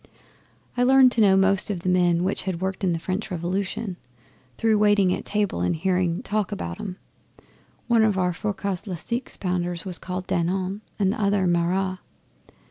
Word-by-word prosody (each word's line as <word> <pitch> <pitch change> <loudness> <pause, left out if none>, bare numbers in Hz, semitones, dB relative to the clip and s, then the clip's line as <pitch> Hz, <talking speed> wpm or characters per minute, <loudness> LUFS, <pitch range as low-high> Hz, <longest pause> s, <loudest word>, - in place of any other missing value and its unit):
I 245 - 0
learned 260 0 +6
to 235 - +1
know 195 -2 +5
most 195 +1 +3
of 190 -4 -3
the 185 - -1
men 175 -1 +3
which 190 +2 0
had 175 -3 -3
worked 190 +1 -2
the 180 -4 0
French 185 +6 -3
Revolution, 185 +3 -3 0.6
through 220 -2 +2
waiting 205 -3 +4
at - - -5
table 205 - -1
and 90 - +1
hearing 180 +2 0
talk 215 -4 -1
about 85 -1 -5
'em. 185 -1 -6 0.9
One 235 -1 +4
of 215 -3 +2
our 180 -1 +1
forecas'le 195 -1 -3
six 235 +9 -2
pounders 175 -2 -2
was 180 -3 0
called 185 0 -5
Danton 185 +4 -1 0.2
and 195 -2 +2
t'other 200 -3 +1
Marat. 180 +2 0
190 Hz, 165 wpm, -24 LUFS, 180-205 Hz, 0.9 s, learned